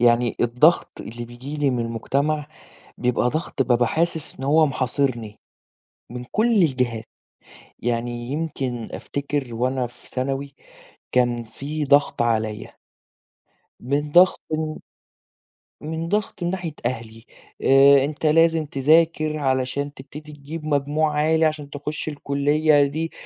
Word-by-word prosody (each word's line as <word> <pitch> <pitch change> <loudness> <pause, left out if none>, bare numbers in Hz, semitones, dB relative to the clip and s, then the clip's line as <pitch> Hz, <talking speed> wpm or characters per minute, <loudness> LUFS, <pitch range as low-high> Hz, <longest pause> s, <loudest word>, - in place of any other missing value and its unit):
يعني 120 0 +3
الضغط 125 +8 +3
اللي 120 +1 -7
بييجي 125 +5 -8
لي 145 -2 +1
من 125 - -1
المجتمع 140 +6 -1 0.5
بيبقى 125 0 +1
ضغط 155 -1 -3
بابقى 120 -1 +3
حاسس 160 +2 -1
إن 135 - -9
هو 155 +3 +4
محاصرني، 130 -4 -2 0.7
من 125 +1 -6
كل 230 +3 +2
الجهات 125 -7 0 0.8
يعني 120 +1 -3
يمكن 135 -6 -3
أفتكر 140 -3 -4
وأنا 125 +2 -1
في 120 - -19
ثانوي 135 +2 -3 0.6
كان 120 -1 +1
في 145 +6 -5
ضغط 145 -1 +3
عليّا. 110 -2 -1 1.1
من 145 +3 -2
ضغط 180 +3 +6
من 155 0 -2 1.1
من 160 +2 -4
ضغط 205 -2 -2
من 175 - 0
ناحية 175 -4 -4
أهلي 115 -2 -4 0.4
آآ 135 0 +6
أنت 150 +2 -5
لازم 165 +1 +4
تذاكر 155 +2 +2
علشان 135 0 -1
تبتدي 150 +3 -11
تجيب 150 +2 -8
مجموع 150 +1 +1
عالي، 160 +2 +3
عشان 155 -2 -2
تخش 145 +2 -5
الكلية 145 +1 +2
دي 160 +4 -3
140 Hz, 125 wpm, -23 LUFS, 125-155 Hz, 1.1 s, ضغط